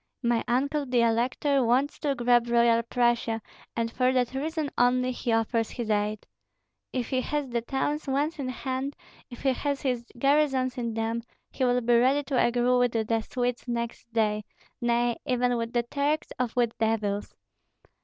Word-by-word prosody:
My 235 -1 +2
uncle 280 +4 0
the 250 -1 +2
elector 250 +4 +2
wants 255 +5 +1
to 285 -3 0
grab 240 -1 +3
Royal 235 -1 +4
Prussia, 235 -1 +1 0.4
and 230 0 -1
for 255 +2 +2
that 250 -1 +1
reason 305 +1 -2
only, 250 +1 +3
he 245 -1 -3
offers 225 0 +1
his 235 -3 -3
aid. 210 0 -1 0.7
If 250 -3 -2
he 260 -2 +1
has 295 +1 -2
the 235 -1 -1
towns 285 +5 -2
once 290 +4 0
in 260 -2 -2
hand, 260 +2 -3 0.3
if 245 - -10
he 265 -1 +3
has 280 +1 -2
his 250 -3 0
garrisons 275 -1 +2
in 235 -3 -3
them, 225 +1 -1 0.3
he 260 - 0
will 245 0 +2
be 240 0 +3
ready 270 +4 +3
to 270 -3 +1
agree 245 +1 +2
with 245 -1 +2
the 225 0 0
Swedes 245 +1 -3
next 235 0 -4
day, 215 -2 +1 0.4
nay, 240 0 +1
even 250 -1 +2
with 230 0 -2
the 240 -1 +1
Turks 285 +5 -1
or 250 - +2
with 240 -2 +1
devils. 215 -2 -1
245 Hz, 175 wpm, -27 LUFS, 235-265 Hz, 0.7 s, Royal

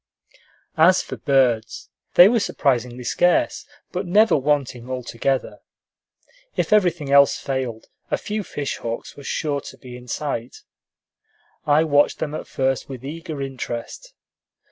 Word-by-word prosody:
As 180 +3 +6
for - - -7
birds, 125 -6 +1 0.2
they 175 - +10
were 230 +2 +3
surprisingly 125 - -1
scarce, 180 - +1 0.2
but 180 +1 -3
never 210 +5 +5
wanting 135 -4 -1
altogether. 130 +1 -2 1.0
If - - 0
everything 175 -8 +2
else 140 0 +6
failed, 130 -5 -4 0.2
a - - +1
few 210 0 -3
fish 145 -6 -4
hawks 115 0 -6
were 140 - -11
sure 145 0 -2
to - - -11
be 125 -1 -11
in 125 0 -12
sight. 125 -2 -4 1.0
I 150 +2 +5
watched 145 -2 +3
them 150 - -4
at - - -6
first 135 0 -1
with 130 -1 -8
eager 155 -1 -5
interest. 135 - -6
140 Hz, 135 wpm, -22 LUFS, 125-165 Hz, 1.0 s, they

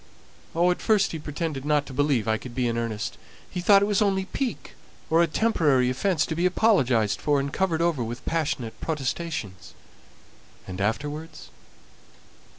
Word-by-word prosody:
"Oh, 175 +2 +4
at 180 - -3
first 210 -3 +3
he 160 - -5
pretended 150 -2 -4
not 150 0 +1
to 135 - -9
believe 140 -5 +1
I 110 0 +1
could 125 -2 -10
be 125 -2 +1
in 115 - -1
earnest; 110 -2 -3 0.3
he 180 - -5
thought 200 +2 +6
it - - +1
was 205 -1 +1
only 195 -2 +2
pique, 255 +5 -4 0.4
or 165 +1 +5
a 170 - +4
temporary 150 - +2
offence 155 +4 +1
to - - -3
be 175 +3 +2
apologized 130 - +2
for 145 -1 +2
and 140 0 -3
covered 170 -4 +1
over 165 -8 +1
with 120 +2 -6
passionate 140 -8 -2
protestations." 135 - -4 0.9
"And 95 +1 -6
afterwards?" 150 +9 -3
150 Hz, 165 wpm, -25 LUFS, 125-175 Hz, 0.9 s, thought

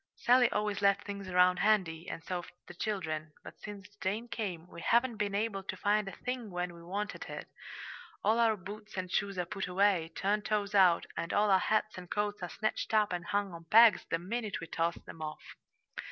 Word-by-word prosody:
Sally 245 0 +4
always 210 -1 -1
left 200 0 +3
things 200 -2 -6
round 180 0 +4
handy, 180 -5 +1
and 165 - -6
so've 175 -2 -4
the - - -10
children; 160 -6 -3
but - - -11
since 205 -3 -8
Jane 210 +5 -1
came, 185 -8 -4
we 170 - -10
haven't 235 +5 +2
been 205 -1 -1
able 205 -1 -1
to 190 - -6
find 210 0 +1
a - - -4
thing 250 -1 -4
when 180 -1 -3
we 170 - -12
wanted 200 +4 -4
it. - - -7 0.8
All 220 +3 +3
our 225 -2 +4
boots 210 +3 -9
and 185 -1 -3
shoes 200 -1 0
are 180 - 0
put 190 +2 -4
away, 180 -3 +2
turned 205 +2 0
toes 210 -1 -1
out, 185 -4 +5
and 170 - -3
all 205 0 +3
our 190 - +6
hats 215 0 0
and 180 -1 -11
coats 205 -1 -1
are 175 - -4
snatched 215 +2 -2
up 210 -3 +3
and 175 -1 -3
hung 205 -2 -1
on 165 0 -10
pegs 225 +5 +7
the 165 - +1
minute 210 +4 -3
we - - -6
toss 165 +1 -1
them 160 - -12
off. 155 -1 -7
200 Hz, 210 wpm, -32 LUFS, 180-210 Hz, 0.8 s, pegs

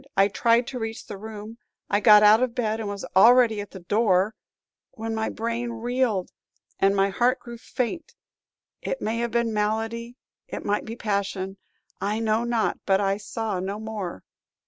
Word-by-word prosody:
I 195 +1 +5
tried 230 +4 +3
to 250 0 -5
reach 225 0 -5
the - - -7
room; 220 +2 -9 0.3
I 205 - +2
got 210 -1 +7
out 215 +2 +7
of 255 -2 0
bed 220 -2 -1
and 215 -2 -3
was 200 -1 -5
already 230 +1 +6
at 205 - -8
the 190 - -10
door 200 +1 +2 0.6
when 225 0 -4
my 220 0 -1
brain 235 +1 -3
reeled, 235 -4 -1 0.5
and 195 +1 +3
my 195 0 +3
heart 245 +6 +1
grew 240 -1 -10
faint 260 +7 -4 0.7
It - - -3
may 225 +2 -2
have 235 0 -1
been 235 0 0
malady, 225 +3 -2 0.3
it - - -6
might 205 +1 0
be 225 - -6
passion, 200 -3 -2 0.4
I 210 +2 0
know 220 0 +1
not; 235 -2 0
but 195 0 +4
I 195 -1 +1
saw 210 -1 -3
no 195 +3 -4
more. 210 - -5
220 Hz, 175 wpm, -25 LUFS, 205-235 Hz, 0.7 s, got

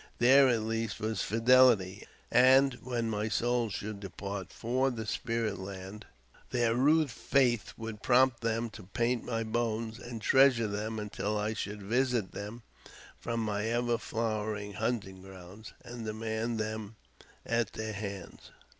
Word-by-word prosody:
There 135 +3 +6
at 115 -3 +1
least 115 -1 -2
was 110 +1 -2
fidelity, 115 -4 +4 0.2
and, 130 +2 +6
when 120 -2 -2
my 110 0 -1
soul 120 0 +1
should 105 +1 -5
depart 100 0 -6
for 130 +3 0
the 115 -3 -5
spirit 115 -2 -2
land, 95 +2 -8 0.4
their 120 -2 +1
rude 145 +3 +3
faith 125 -5 +1
would 110 -2 -7
prompt 125 -1 +3
them 115 0 -1
to 110 - -10
paint 120 +3 0
my 115 -2 -2
bones, 115 0 -2
and 120 -1 -7
treasure 130 0 +4
them 105 +2 -3
until 105 0 -3
I 105 +1 -1
should 105 -1 -5
visit 120 -1 0
them 105 +3 -7 0.6
from 115 -1 -2
my 105 -1 -1
ever 120 0 0
flowering 110 -3 -3
hunting 100 -3 -3
ground, 95 +2 -12
and 120 -1 -7
demand 110 +1 -3
them 110 0 -4 0.5
at 115 0 0
their 110 0 -4
hands. 100 -2 -7
115 Hz, 145 wpm, -31 LUFS, 105-120 Hz, 0.6 s, There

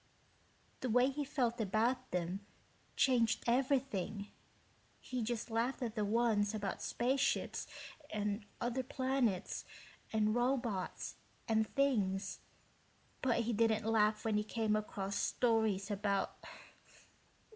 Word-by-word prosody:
"The 255 - -2
way 250 +3 +5
he 295 +2 -2
felt 245 -4 0
about 230 +5 +1
them 180 +3 -2 0.5
changed 245 -4 +3
everything. 245 -6 0 0.7
He 255 -1 -4
just 230 0 -2
laughed 240 +4 0
at 230 -3 -2
the 215 -3 0
ones 215 -1 +2
about 200 -3 -3
space 255 +3 0
ships - - 0 0.4
and 210 0 -1 0.2
other 245 +2 0
planets 255 -7 0 0.5
and 215 -1 +2
robots 240 -5 -1 0.3
and 220 -1 +2
things, 210 -9 +1 0.8
but 245 -2 +2
he 235 +1 -1
didn't 220 0 +2
laugh 215 -1 +3
when 210 -1 +2
came 220 0 0
across 200 -2 -2
stories 220 -5 +1
about 200 -1 0
225 Hz, 115 wpm, -36 LUFS, 210-245 Hz, 0.8 s, way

